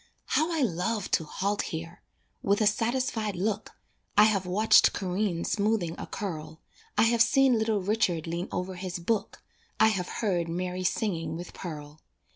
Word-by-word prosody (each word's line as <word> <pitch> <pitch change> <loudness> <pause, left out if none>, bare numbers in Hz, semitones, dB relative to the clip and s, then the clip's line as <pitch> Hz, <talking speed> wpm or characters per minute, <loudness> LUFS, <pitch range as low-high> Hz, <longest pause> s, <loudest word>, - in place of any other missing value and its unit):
How 315 +3 +1
I 320 -4 +1
love 205 +1 -1
to 160 - +2
halt 200 +6 -1
here! 165 +1 -6 0.4
With 200 +1 +2
a 215 - +3
satisfied 225 0 0
look, 210 +3 -2 0.4
I 210 - +9
have 200 -4 +2
watched 210 +5 +5
Corinne 185 -2 -1
smoothing 205 -5 0
a - - -6
curl, 160 -5 -5 0.4
I - - +6
have 230 0 +3
seen 265 -1 +4
little 220 -3 0
Richard 195 -5 +1
lean 170 +2 -3
over 180 +1 -3
his 185 0 -4
book, 200 +5 -2 0.4
I 220 - +6
have 185 -4 -2
heard 180 -7 -1
Mary 180 +2 -3
singing 165 -5 -1
with 175 +1 -8
Pearl. 150 -3 -8
195 Hz, 160 wpm, -28 LUFS, 175-220 Hz, 0.4 s, I